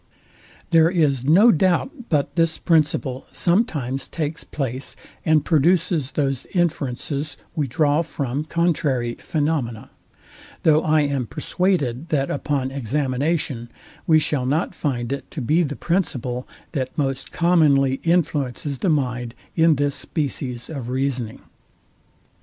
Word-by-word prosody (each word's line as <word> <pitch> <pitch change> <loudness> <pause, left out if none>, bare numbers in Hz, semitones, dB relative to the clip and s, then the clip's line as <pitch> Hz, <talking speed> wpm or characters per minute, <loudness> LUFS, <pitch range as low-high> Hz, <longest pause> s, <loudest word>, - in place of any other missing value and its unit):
There 165 -1 +6
is 150 -8 +2
no 195 - +7
doubt 190 - 0
but 150 -1 0
this 165 -1 +2
principle 150 -5 +1
sometimes 155 - 0
takes 155 0 -3
place, 135 -2 -4 0.3
and 155 -2 +3
produces 165 -2 +2
those 135 -3 -1
inferences 145 -3 -1 0.2
we 150 -3 0
draw 145 +3 +2
from 145 -3 -3
contrary 150 -8 0
phaenomena: 145 -8 -2 0.7
though 155 -1 +5
I 155 -1 +3
am 140 -4 -1
perswaded, 160 - -1
that 140 -3 0
upon 140 -2 -1
examination 135 0 -1 0.4
we 160 -2 +6
shall 145 -4 +1
not 155 +6 0
find 125 -4 -2
it 140 - -6
to - - -6
be 150 +7 +2
the 145 -3 -1
principle, 130 -9 -2 0.2
that 130 -5 -3
most 135 -3 -2
commonly 145 -6 +3
influences 145 -5 0
the 190 - +1
mind 125 -5 -1 0.2
in 165 -1 +5
this 145 0 0
species 130 -6 -3
of 135 -7 -6
reasoning. 130 -3 -2
145 Hz, 125 wpm, -22 LUFS, 130-165 Hz, 0.7 s, no